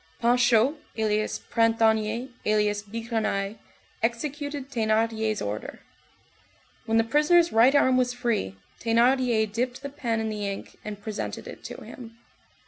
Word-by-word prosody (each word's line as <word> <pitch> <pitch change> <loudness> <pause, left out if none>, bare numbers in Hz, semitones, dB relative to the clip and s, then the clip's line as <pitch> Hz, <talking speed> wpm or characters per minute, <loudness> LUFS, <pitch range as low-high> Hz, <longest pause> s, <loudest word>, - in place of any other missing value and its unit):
Panchaud, 245 +3 +3 0.2
alias 215 -1 0
Printanier, 225 +1 +1
alias 210 -1 +1
Bigrenaille, 215 -1 -3 0.4
executed 285 +4 -3
Thénardier's 220 -2 0
order. 105 +1 -5 1.1
When 225 0 +2
the 225 - +5
prisoner's 300 +7 +4
right 240 +5 +5
arm 260 -2 +4
was 250 -1 +2
free, 235 - -1 0.2
Thénardier 235 0 +3
dipped 250 +3 -2
the 280 - -4
pen 240 -5 -2
in 220 0 -2
the 210 -1 -3
ink 195 0 -7
and 210 -1 -6
presented 215 0 -5
it - - -10
to - - -8
him. 230 -2 -11
230 Hz, 130 wpm, -26 LUFS, 215-250 Hz, 1.1 s, the